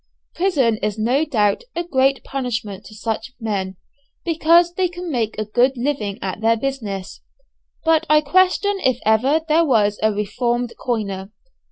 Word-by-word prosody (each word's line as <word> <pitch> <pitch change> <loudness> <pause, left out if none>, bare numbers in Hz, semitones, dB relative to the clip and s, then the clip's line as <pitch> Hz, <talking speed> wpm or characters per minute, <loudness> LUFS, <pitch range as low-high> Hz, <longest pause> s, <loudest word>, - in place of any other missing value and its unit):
Prison 285 - +1
is 210 0 -2
no 250 +8 +1
doubt 210 - +1
a 345 - -1
great 270 -5 +1
punishment 230 -7 -4
to 215 - -12
such 225 +3 -4
men, 195 -5 -3 0.5
because 335 +1 +4
they 370 0 +1
can 355 -1 -7
make 225 -5 -1
a 215 - -2
good 245 +5 +2
living 235 -6 -2
at 190 +2 -4
their 230 +1 +3
business; 220 -7 -4 0.6
but 325 0 +3
I 305 0 +6
question 370 +5 +2
if 260 -7 +1
ever 255 +9 +3
there 320 +2 +4
was 210 -8 +2
a 215 - +3
reformed 235 +4 -1
coiner. 200 -5 -2
245 Hz, 155 wpm, -20 LUFS, 215-310 Hz, 0.6 s, I